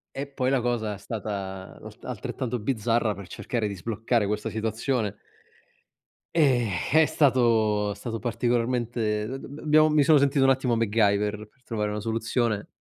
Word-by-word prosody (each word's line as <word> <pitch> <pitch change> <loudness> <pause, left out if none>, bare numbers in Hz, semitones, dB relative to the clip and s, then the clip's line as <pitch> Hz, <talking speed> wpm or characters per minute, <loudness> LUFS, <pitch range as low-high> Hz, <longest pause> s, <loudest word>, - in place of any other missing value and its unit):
E 140 +1 -4
poi 130 -2 -1
la 135 -2 +2
cosa 115 -3 -1
è - - -7
stata 100 -3 -6
l - - -8 0.2
altrettanto 125 -2 -4
bizzarra 115 -1 0
per 100 -2 -10
cercare 115 +3 -3
di 100 - -5
sbloccare 110 +4 -1
questa 105 +1 -2
situazione. 110 0 -1 1.2
E 130 -7 +3 0.2
è 155 +2 +6
stato 115 -8 +2
è - - -5
stato 115 +2 -5
particolarmente 120 -2 -1
d 130 +3 -4
d - - -10
b 145 +2 -10
abbiamo 155 0 +4
mi 150 -1 +4
sono 155 +2 +6
sentito 140 -1 +3
un 135 - +5
attimo 130 -2 +2
MacGyver 105 -1 +1
per 125 +4 -35
trovare 105 -3 -2
una 105 - -3
soluzione 115 0 -1
115 Hz, 165 wpm, -26 LUFS, 105-130 Hz, 1.2 s, è